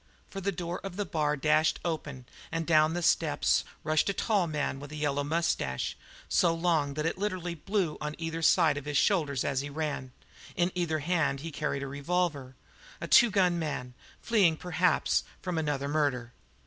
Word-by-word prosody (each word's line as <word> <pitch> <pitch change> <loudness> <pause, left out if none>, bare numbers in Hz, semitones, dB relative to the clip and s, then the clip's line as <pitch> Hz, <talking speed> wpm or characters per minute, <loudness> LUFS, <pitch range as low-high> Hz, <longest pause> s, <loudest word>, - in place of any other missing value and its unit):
For 195 - -5
the 200 +1 0
door 175 -2 -4
of 195 -2 -6
the 205 +1 -2
bar 150 -3 0
dashed 155 +2 +2
open 150 -6 -4 0.3
and 165 0 -2
down 155 0 +4
the 175 - -2
steps - - +2 0.2
rushed 155 +4 +2
a - - +1
tall 200 -4 +1
man 145 -3 -2
with 145 +1 -9
light 150 - -6
yellow 145 -1 0
moustache, 150 - -1 0.3
so 170 -1 +3
long 165 -5 +1
that 155 +1 -2
it 165 - -1
literally 185 -4 -2
blew 175 0 -2
on 150 0 -3
either 165 0 -4
side 155 -2 +4
over 145 +1 -8
his 145 - +1
shoulders 150 - +2
as 135 -1 0
he 145 - -6
ran; 145 -3 -3 0.4
in 175 -1 +1
either 170 -3 0
hand 160 -6 +1
he 165 +1 -6
carried 140 -2 -2
a - - -4
revolver 145 -2 -2 0.4
a - - -5
two 240 - +7
gun 180 -4 +2
man, 140 -6 -4 0.3
fleeing, 195 -9 +3
perhaps, 175 0 +1 0.2
from 180 -3 -2
another 145 -3 -1
murder. 140 -5 -1
155 Hz, 185 wpm, -29 LUFS, 145-175 Hz, 0.4 s, two